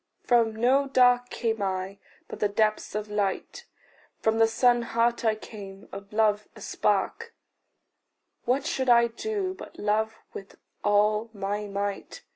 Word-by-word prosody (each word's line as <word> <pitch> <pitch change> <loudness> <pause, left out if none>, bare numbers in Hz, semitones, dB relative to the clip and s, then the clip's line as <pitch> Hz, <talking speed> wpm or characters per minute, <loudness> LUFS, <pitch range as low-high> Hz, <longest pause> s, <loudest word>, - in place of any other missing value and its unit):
From 230 -3 +3
no 260 +5 +3
dark 245 -2 +4
came 225 -3 -2
I, 190 0 -3 0.3
but - - -8
the 210 - +2
depths 215 0 0
of 210 0 -3
light; 205 -2 -3 0.5
From 220 0 +1
the 225 - +6
sun 240 +2 +3
heart 235 +1 0
I 220 -1 +2
came, 200 -3 -11
of 200 0 -9
love 215 -1 +1
a 215 - -13
spark: 305 - -1 1.1
What 265 +4 +1
should 260 -5 -1
I 235 -1 +6
do 385 - -3
but 380 - -12
love 220 +1 0 0.2
with 195 - -10 0.3
all 210 +2 +2
my 205 +1 -3
might? 200 0 -4
220 Hz, 145 wpm, -27 LUFS, 205-240 Hz, 1.1 s, the